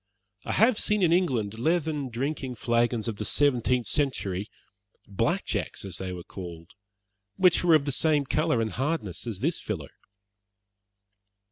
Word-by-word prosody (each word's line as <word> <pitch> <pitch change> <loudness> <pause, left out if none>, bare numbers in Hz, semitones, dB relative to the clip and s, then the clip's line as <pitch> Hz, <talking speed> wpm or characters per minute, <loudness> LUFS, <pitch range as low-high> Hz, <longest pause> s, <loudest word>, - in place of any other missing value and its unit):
"I - - -2
have 225 +2 +4
seen 210 -2 +2
in 170 -1 +4
England 120 - 0
leathern 155 -1 0
drinking 130 +1 -3
flagons 120 0 +1
of 110 -3 -3
the 105 - -3
seventeenth 125 -1 +2
century 105 -9 -1 0.6
'black 100 -2 0
jacks' - - -3
as 95 -3 -7
they 95 -1 -4
were 90 -1 -6
called 85 -3 -9 0.6
which 180 -2 +4
were 170 -2 +6
of 145 -2 +2
the 140 - -1
same 150 0 +2
colour 155 -3 +1
and 110 -1 -1
hardness 130 - -3
as 105 -4 -5
this 165 +4 0
filler." 85 -10 -5
125 Hz, 150 wpm, -27 LUFS, 105-155 Hz, 0.6 s, were